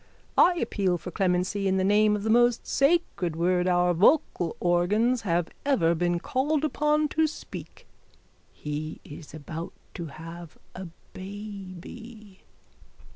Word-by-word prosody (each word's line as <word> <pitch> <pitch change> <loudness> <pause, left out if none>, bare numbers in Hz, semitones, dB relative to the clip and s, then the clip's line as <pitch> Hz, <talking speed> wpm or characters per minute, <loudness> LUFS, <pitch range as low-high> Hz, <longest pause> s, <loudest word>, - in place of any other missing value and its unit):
I 355 - +6
appeal 200 - 0
for 180 - -8
clemency 185 +1 0
in 190 0 +2
the 190 - +1
name 210 +2 +4
of 205 - -4
the 220 - +1
most 240 0 +3
sacred 275 - +1
word 180 +2 +1
our 180 0 +3
vocal 180 - +2
organs 210 +8 +2
have 175 -4 0
ever 195 -13 +3
been 175 +1 0
called 290 - 0
upon 300 0 +1
to 320 +1 +2
speak. 310 - -9 0.7
He 150 +1 -5
is 150 +1 -11
about 155 +2 -7 0.2
to 170 - -5
have 165 +2 -10 0.2
a 185 0 -7 0.3
baby. 205 +2 -9
190 Hz, 130 wpm, -27 LUFS, 175-235 Hz, 0.7 s, I